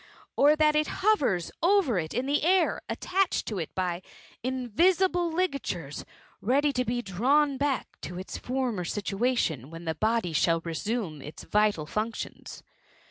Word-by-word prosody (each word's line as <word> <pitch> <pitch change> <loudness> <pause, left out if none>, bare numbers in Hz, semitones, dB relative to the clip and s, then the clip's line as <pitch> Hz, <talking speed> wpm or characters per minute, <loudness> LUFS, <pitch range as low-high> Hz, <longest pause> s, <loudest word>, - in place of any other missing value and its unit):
Or 295 +2 +5
that 305 0 +3
it 305 0 +2
hov^a 280 - +1
over 340 - +3
it 160 -1 -4
in 250 +3 -2
air, 335 +5 +2
attached 385 0 0
to 210 -4 -3
it 160 - -5
by 180 -1 -1 0.4
inTisible 340 - +2
ligaturefi» 275 - -2 0.4
ready 280 +6 +2
to 250 -1 +1
be 240 0 -2
drawn 270 +9 +2
back 280 -2 -2
to 175 - -6
its 185 - -6
former 250 -7 -2
situation^ 200 - -1
whcai 165 +1 -9
tbfi» 160 -1 -3
body 220 -6 +1
flhall 165 +2 +2
resume 170 - -3
its 150 +3 -9
vital 210 -7 +1
functions? 215 +7 -5
240 Hz, 140 wpm, -28 LUFS, 180-295 Hz, 0.4 s, Or